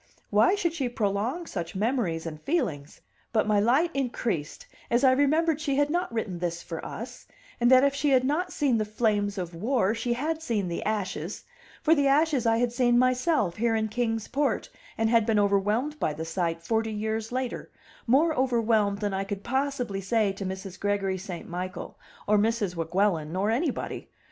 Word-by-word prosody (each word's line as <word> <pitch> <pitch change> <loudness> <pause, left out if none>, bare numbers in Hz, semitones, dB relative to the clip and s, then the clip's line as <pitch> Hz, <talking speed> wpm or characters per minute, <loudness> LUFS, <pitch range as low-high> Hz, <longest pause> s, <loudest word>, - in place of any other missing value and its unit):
Why 215 - +4
should 345 -5 -1
she 275 -7 -2
prolong 235 - -1
such 175 - -5
memories 200 -7 -1
and 155 -2 -6
feelings? 165 - -2 0.3
But 220 - +2
my 210 -1 +3
light 265 +11 +3
increased 235 - -2 0.2
as 240 +3 +2
I 260 - +7
remembered 305 +4 +2
she 285 -4 0
had 290 +1 +2
not 350 -2 -1
written 210 -6 -3
this 175 -1 -3
for 165 -1 -6
us, 245 +2 -8 0.3
and 240 0 +4
that 260 0 +7
if 280 0 +3
she 290 +1 0
had 260 -2 +4
not 325 +7 0
seen 265 -7 +1
the - - +1
flames 210 -2 0
of 175 -2 -4
war, 215 +3 +1
she 235 +1 -1
had 310 +6 -2
seen 215 - -1
the 170 - -3
ashes; 195 -4 -3 0.4
for 320 - +5
the 285 -3 +3
ashes 285 -3 +3
I 225 0 +3
had 240 0 0
seen 240 -1 +3
myself 255 - +2
here 230 +1 +1
in 220 0 0
Kings 225 -1 -1
Port, 285 +2 -1 0.3
and 225 - +2
had 230 0 +4
been 220 -1 +1
overwhelmed 210 +9 +1
by 155 - 0
the 160 +1 -5
sight, 165 0 -2
forty 225 +3 0
years 220 +1 -3
later, 255 0 -3 0.4
more 300 +7 +4
overwhelmed 230 -6 +2
than 205 -1 -1
I 190 0 -1
could 200 0 -5
possibly 260 -6 -1
say 210 +1 +1
to 195 +1 -6
Mrs. 190 0 -6
Gregory 195 -2 0
St. 180 -2 -7
Michael, 180 +1 -5 0.3
or 210 0 +4
Mrs. 215 -3 0
Weguelin, 165 -1 0
or 200 +3 +1
anybody. 275 +5 -2
225 Hz, 190 wpm, -27 LUFS, 195-260 Hz, 0.4 s, I